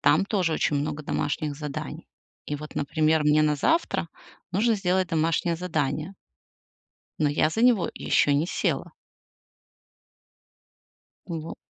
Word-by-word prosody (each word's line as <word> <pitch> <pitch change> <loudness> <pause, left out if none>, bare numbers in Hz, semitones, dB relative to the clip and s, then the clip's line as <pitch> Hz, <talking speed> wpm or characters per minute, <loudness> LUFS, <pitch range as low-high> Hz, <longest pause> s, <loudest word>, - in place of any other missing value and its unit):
Там 150 +6 +4
тоже 190 -6 0
очень 150 - +1
много 145 +1 -2
домашних 145 0 -2
заданий. 145 -1 -6 0.4
И 145 - -2
вот, 150 +1 -9
например, 155 +2 +1
мне 150 +1 +4
на 150 -1 +3
завтра 320 - +1 0.4
нужно 220 +5 +3
сделать 185 -2 +1
домашнее 165 +1 +1
задание. 155 0 -2 1.1
Но 155 - +3
я 150 +2 +2
за 220 - -2
него 240 -6 +4
ещё 145 - +2
не 145 +4 +2
села. - - -1 2.3
Вот. 165 -2 -5
155 Hz, 125 wpm, -26 LUFS, 150-180 Hz, 2.3 s, Там